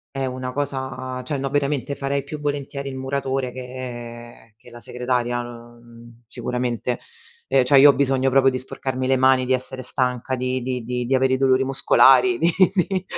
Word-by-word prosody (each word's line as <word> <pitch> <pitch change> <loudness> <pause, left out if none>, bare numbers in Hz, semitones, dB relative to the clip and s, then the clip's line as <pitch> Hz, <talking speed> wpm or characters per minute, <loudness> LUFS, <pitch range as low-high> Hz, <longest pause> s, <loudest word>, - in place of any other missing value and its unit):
È 135 -1 -1
una 125 0 -5
cosa, 130 -2 -4
cioè 145 -3 -3
no, 135 0 -2
veramente 140 -1 -1
farei 140 0 -2
più 150 +1 -7
volentieri 140 -1 -4
il 135 - -5
muratore, 135 -1 -2
che 120 -3 -9
che 120 - -17
la 120 0 -12
segretaria, 125 0 -2
uhm, 120 0 -13
sicuramente. 125 -1 -3 0.5
Ehm, 135 -1 +3
cioè 135 +2 +5
io 145 +1 +9
ho - - +4
bisogno 135 -1 +1
proprio 135 0 +4
di 130 - -3
sporcarmi 130 0 -4
le 130 0 +3
mani, 130 0 +3
di 130 - +2
essere 130 0 -3
stanca, 125 +1 -2
di 130 0 -2
di 125 -1 -3
di 125 0 -3
di 135 - +2
avere 130 0 +2
i - - +2
dolori 130 0 +3
muscolari, 130 -2 +4
di 165 - +2 0.3
di 185 0 0
130 Hz, 180 wpm, -22 LUFS, 125-135 Hz, 0.5 s, io